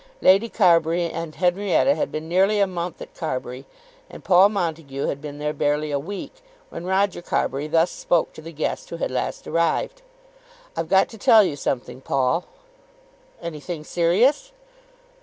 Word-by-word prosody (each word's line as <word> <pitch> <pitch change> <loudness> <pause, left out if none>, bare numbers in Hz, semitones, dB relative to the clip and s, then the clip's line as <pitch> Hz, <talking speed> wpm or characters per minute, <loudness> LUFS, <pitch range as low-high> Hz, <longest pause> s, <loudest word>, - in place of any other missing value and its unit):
Lady 195 +5 +4
Carbury 170 -4 +3
and 165 -2 -6
Henrietta 190 +8 +2
had 290 - -2
been 155 +1 -5
nearly 195 +5 +3
a 200 - +5
month 180 -2 -5
at - - -14
Carbury, 130 -4 -5 0.4
and - - -12
Paul 190 +2 +6
Montague 160 -8 -3
had 140 - -3
been 145 -1 -7
there 150 0 -2
barely 150 +1 0
a 140 - 0
week, 195 - -7 0.4
when 175 - -7
Roger 190 -1 +1
Carbury 145 -4 -1
thus 165 +2 +2
spoke 170 -2 0
to - - -11
the 165 +1 -9
guest 155 -1 -3
who 170 - -6
had - - -2
last 130 - -3
arrived. 170 - 0 0.7
"I've - - -3
got 190 0 +4
to 225 - -12
tell 220 +1 +7
you 155 - -1
something, 130 -2 -4
Paul." 135 +6 0 1.0
"Anything 155 0 -6
serious?" 215 - +2
170 Hz, 160 wpm, -23 LUFS, 150-190 Hz, 1.0 s, tell